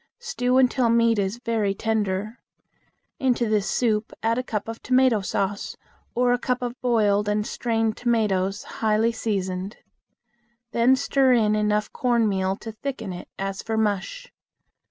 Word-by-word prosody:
Stew 365 - 0
until 255 -2 +3
meat 230 -1 +3
is 195 +3 -1
very 225 -5 -1
tender. 215 0 -2 0.8
Into 245 -3 +1
this 215 -2 +1
soup 220 -3 0
add 230 +2 +1
a - - -2
cup 215 -4 -4
of 225 0 -6
tomato 255 -4 +3
sauce 195 +1 -2 0.4
or 245 0 +3
a 245 - 0
cup 250 0 -1
of 245 0 -5
boiled 210 -4 +2
and 210 0 0
strained 225 -2 -1
tomatoes 205 -5 0
highly 220 +1 +1
seasoned. 195 -3 -3 0.9
Then 240 +3 +4
stir 265 -1 +2
in 215 -3 +3
enough 210 0 0
cornmeal 210 -6 +1
to 225 - -6
thicken 220 -3 -5
it 175 - -8
as 195 0 -3
for 225 -1 -3
mush. 220 - -2
225 Hz, 145 wpm, -24 LUFS, 205-245 Hz, 0.9 s, Then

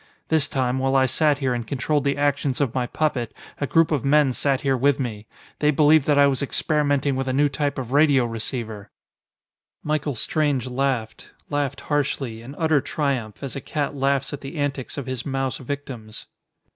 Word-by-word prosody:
This 155 -2 +3
time, 130 -1 0
while 135 +1 +1
I 135 -1 +5
sat 150 +2 +2
here 130 -2 0
and 120 -2 -4
controlled 140 +2 0
the 140 0 +1
actions 140 -2 0
of 135 -5 0
my 125 -2 -1
puppet, 130 -7 -1 0.2
a 140 - -1
group 165 +2 +3
of 145 -6 0
men 140 -1 +4
sat 135 +1 0
here 135 -2 +2
with 140 +2 +2
me. 110 -5 -4 0.3
They 150 - +3
believed 150 0 +4
that 145 -1 +4
I 145 - +7
was 140 -1 +1
experimenting 145 -1 +1
with 135 0 -2
a 130 - 0
new 145 +2 +3
type 145 +1 -2
of 125 -2 -5
radio 140 -3 +4
receiver!" 110 -2 -5 0.9
Michael 150 -2 -1
Strange 145 +1 0
laughed, 125 -3 -2 0.2
laughed 145 -1 -1
harshly, 135 -6 -2
in 130 +5 -10
utter 160 -3 +2
triumph, 135 -9 -2
as 135 - -5
a 135 - -4
cat 145 +1 -2
laughs 140 +1 0
at 145 - -5
the 135 +4 -7
antics 140 -2 -3
of 140 - -4
his 130 -2 -4
mouse 135 -1 -2
victims. 130 -5 -6
140 Hz, 190 wpm, -23 LUFS, 130-145 Hz, 0.9 s, I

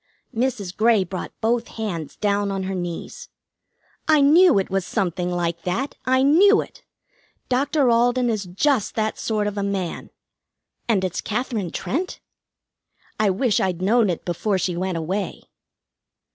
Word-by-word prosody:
Mrs. 230 -7 -1
Grey 220 -2 +4
brought 185 0 -6
both 230 +1 +1
hands 175 -10 -5
down 205 -1 0
on 195 -1 -2
her 190 +1 -3
knees. 175 -2 -6 0.8
"I 310 -1 +5
knew 325 - +6
it 195 -1 -1
was 195 -1 0
something 180 -1 -2
like 170 -1 -2
that. 210 - -2
I 260 +1 +3
knew 390 +9 +6
it! - - -7 0.7
Doctor 275 +2 +2
Alden 245 +2 +3
is 215 -4 -1
just 210 +6 0
that 220 -1 -1
sort 215 -2 -1
of 205 0 -2
a - - -1
man. 195 -3 -3 0.8
And 200 -5 +2
it's 185 -2 -2
Katherine 220 -4 -2
Trent? 340 - -3 1.0
I 215 -2 +3
wish 210 +4 +1
I'd 185 -3 -1
known 220 +1 +3
it 175 - -3
before 190 +3 0
she 180 -1 -1
went 185 0 -2
away." 185 +5 -3
205 Hz, 150 wpm, -22 LUFS, 185-245 Hz, 1.0 s, knew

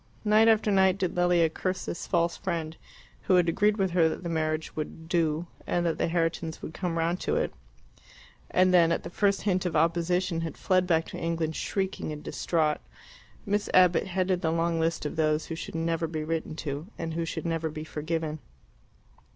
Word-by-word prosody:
Night 215 +1 +5
after 220 -1 +4
night 190 -1 +4
did 185 -3 -2
Lilia 175 -1 +4
curse 185 +4 -3
this - - -5
false 170 -1 +1
friend, 165 -3 -3 0.5
who 185 - +4
had 175 -1 +4
agreed 205 +5 +2
with 190 -3 +1
her 170 -2 +4
that 170 - -5
the 170 - -3
marriage 155 -1 -2
would 160 +1 -6
"do," 165 -1 +1 0.2
and 175 0 0
that 165 - 0
the - - +2
Herritons 165 -1 -1
would 160 - -6
come 175 -2 -2
round 170 +2 0
to - - -1
it, - - 0 1.0
and 185 0 +3
then, 170 -2 +6
at - - 0
the - - -7
first 200 0 +1
hint 185 -3 +1
of 180 -3 -2
opposition, 170 +2 +1
had 165 -1 -5
fled 185 -1 +2
back 165 -2 +2
to - - -7
England 165 -1 -1
shrieking 190 -5 -2
and 150 0 -7
distraught. 155 -3 0 0.6
Miss 205 0 0
Abbott 180 -1 +5
headed 185 -1 0
the 160 - +1
long 165 0 0
list 165 -1 0
of 150 - -4
those 155 -1 +1
who - - -5
should 165 - -7
never 165 0 0
be 155 -1 -4
written 160 0 -3
to, 150 +1 -5
and 165 -1 -4
who 165 +1 -1
should 165 - -4
never 165 -1 -1
be 155 0 -6
forgiven. 155 0 -3
165 Hz, 200 wpm, -28 LUFS, 160-180 Hz, 1.0 s, then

